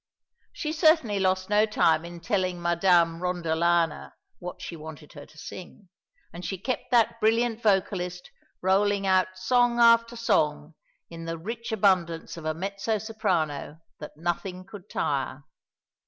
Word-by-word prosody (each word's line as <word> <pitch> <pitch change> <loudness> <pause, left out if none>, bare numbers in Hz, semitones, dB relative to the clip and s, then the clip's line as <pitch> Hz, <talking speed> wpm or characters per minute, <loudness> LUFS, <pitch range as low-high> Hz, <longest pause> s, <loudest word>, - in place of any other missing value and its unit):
She 310 -2 -4
certainly 310 - +3
lost 185 0 +1
no 210 +1 +3
time 165 -6 +2
in 170 0 -9
telling 185 0 -1
Madame 170 -1 +3
Rondolana 170 -2 0 0.3
what 180 0 -7
she 180 -2 -7
wanted 155 -1 -11
her 145 -2 -11
to 155 - -20
sing, 185 +4 -10 0.4
and 175 +2 -8
she 190 +3 -3
kept 250 +8 -4
that 235 -3 +3
brilliant 230 +1 +1
vocalist 185 -4 0 0.3
rolling 200 +1 +2
out 185 0 +2
song 245 +5 +2
after 230 0 +5
song 155 -9 0 0.4
in 165 0 -8
the 165 0 -4
rich 230 +8 -6
abundance 185 -6 +1
of 165 -2 -9
a 155 0 -1
mezzo 200 +5 -2
soprano 180 -10 -2 0.2
that 150 -1 -10
nothing 180 +2 -3
could 200 0 -12
tire. - - -2
185 Hz, 140 wpm, -26 LUFS, 170-215 Hz, 0.4 s, after